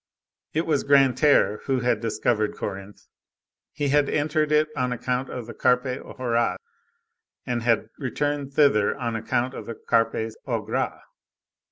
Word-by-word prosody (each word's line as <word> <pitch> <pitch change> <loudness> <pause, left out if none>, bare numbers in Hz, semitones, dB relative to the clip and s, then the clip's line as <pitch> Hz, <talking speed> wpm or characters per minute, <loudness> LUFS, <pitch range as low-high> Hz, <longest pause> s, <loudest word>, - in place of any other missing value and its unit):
It 160 - +1
was 150 -4 +1
Grantaire 135 -5 +4
who 130 -2 0
had 125 +1 +1
discovered 110 -1 0
Corinthe. 100 0 -7 0.7
He 145 -1 -2
had 145 0 +3
entered 155 0 0
it 155 0 +3
on 125 -2 -1
account 125 +1 -2
of 125 -3 -6
the 115 - -8
Carpe 125 +1 +1 0.2
horas, 120 -6 0 0.9
and 120 -1 -1
had 115 -2 +1
returned 145 +1 -2
thither 140 -8 +3
on 120 -4 -3
account 120 +3 -1
of - - -8
the 115 - -5
Carpes 115 -1 0
au - - -1
gras. - - -2
125 Hz, 145 wpm, -25 LUFS, 115-145 Hz, 0.9 s, Grantaire